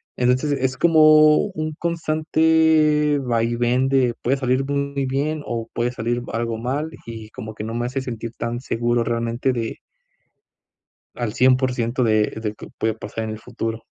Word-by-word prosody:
Entonces, 125 +4 +1
es 130 -1 -1
como 155 -2 +6
un 155 -3 -4
constante 155 -2 +2
vaivén, 120 +1 +1 0.3
puede 135 +3 +1
salir 130 0 +1
muy 140 -1 -2
bien 145 +4 -1
o 115 -1 -4
puede 120 +1 0
salir 120 0 -2
algo 115 0 -2
mal, 135 +7 -2 0.2
y 110 -2 -8
como 110 0 -8
que 105 0 -6
no 115 - -5
me 120 +1 -2
hace 135 +2 -3
sentir 115 -3 -5
tan 120 +1 -3
seguro 120 -1 0
realmente 115 +2 -1
de 115 -2 -3 1.4
al 115 -3 -3
100% 125 -1 +2
de 110 -1 +2
de 105 -1 -3
qué - - -11
puede 110 0 0
pasar 110 0 -6
en 110 - -4
el 110 - -6
futuro. 115 -2 -5
125 Hz, 155 wpm, -22 LUFS, 115-145 Hz, 1.4 s, como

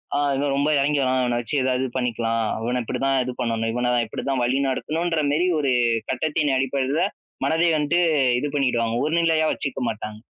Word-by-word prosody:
ஆ - - +2 0.2
இன்னும் 140 0 0
ரொம்ப 140 +2 +1
எறங்கி 145 +1 +1
வரான். 130 -1 +1
இவன 120 -1 0
வச்சு 120 +5 -4
ஏதாவது 130 0 0
பண்ணிக்கலாம். 115 -2 -1 0.2
இவன 125 +2 -1
இப்டிதான் 135 +4 0
இது 125 - -4
பண்ணணும். 115 -2 -1
இவன 125 0 0 0.2
இப்டிதான் 130 +4 -3
வழி 125 +2 +1
நடத்தணுன்ற 160 +4 -1
மெரி 175 +4 +2
ஒரு 140 -3 +1 0.4
கட்டத்தின் 150 +2 0
அடிப்படைல 135 +3 0 0.4
மனதை 165 +2 +2
வன்ட்டு 155 +3 +1 0.4
இது 145 +4 -1
பண்ணிடுவாங்க, 120 -5 +1
ஒருநிலையா 160 0 +2
வச்சுக்க 135 -2 -4
மாட்டாங்க. 110 -1 -5
135 Hz, 165 wpm, -23 LUFS, 125-150 Hz, 0.4 s, ஆ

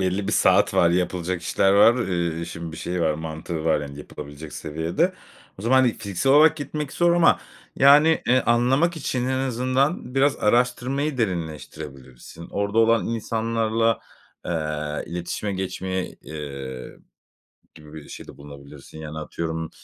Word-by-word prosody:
belli 95 +1 -1
bir 105 - 0
saat 95 0 +3
var, 85 -3 +4
yapılacak 90 0 -1
işler 95 +2 +2
var. 115 +4 +5
Eee, 85 -2 -1
işin 85 -1 -6
bir - - -8
şeyi 90 +2 -3
var. 80 -2 +2
Mantığı 80 +1 -5
var, 80 -2 +2
yani, 70 -1 -8
yapılabilecek 75 +1 -9
seviyede. 80 - -1 0.5
O - - -8
zaman 125 +3 +3
hani 130 -3 +4
fiziksel 105 +5 0
olarak 160 +2 +6
gitmek 150 -1 -5
zor 175 0 +3
ama 175 -1 +4 0.4
yani, 150 +4 +6
eee, 130 +2 +4
anlamak 130 +9 +2
için 125 -4 -2
en 130 0 0
azından 130 +2 0
biraz 135 +1 +3
araştırmayı 125 +5 0
derinleştirebilirsin. 80 - -6
Orada 100 +2 -1
olan 115 0 +4
insanlarla, 115 0 0 0.5
eee, - - -2 0.6
iletişime 90 +4 -3
geçmeye, 95 -1 -4
eee, 70 -4 -7 0.8
gibi 75 -1 -14
bir 80 -2 -10
şeyde - - -10
bulunabilirsin. 70 +1 -12
Yani, 75 0 -7
atıyorum, 80 +1 -4
95 Hz, 140 wpm, -23 LUFS, 80-125 Hz, 0.8 s, olarak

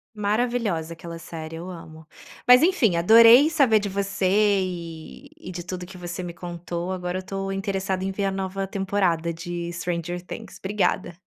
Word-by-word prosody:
Maravilhosa 210 -6 -1
aquela 170 0 -8
série, 165 -1 -8
eu 175 +3 -7
amo. 160 -2 -11 0.4
Mas, 250 +2 +8
enfim, 315 - +3
adorei 230 - +7
saber 270 -9 +4
de 205 0 -3
você 195 -1 -1
e 185 -5 -1
e - - -9
de 175 -1 -6
tudo 180 +1 -6
o - - -6
que 190 - -11
você 175 0 -6
me 175 -1 -6
contou, 175 0 -5
agora 180 -1 -3
eu - - -8
tô 195 0 -4
interessada 195 -1 -2
em 195 - -1
ver 200 +1 -2
a 195 - +1
nova 195 0 -3
temporada 190 -4 0
de 170 0 -5
Stranger 175 0 -3
Things. 180 - -9
Obrigada. 190 -3 -1
185 Hz, 175 wpm, -24 LUFS, 170-200 Hz, 0.4 s, Mas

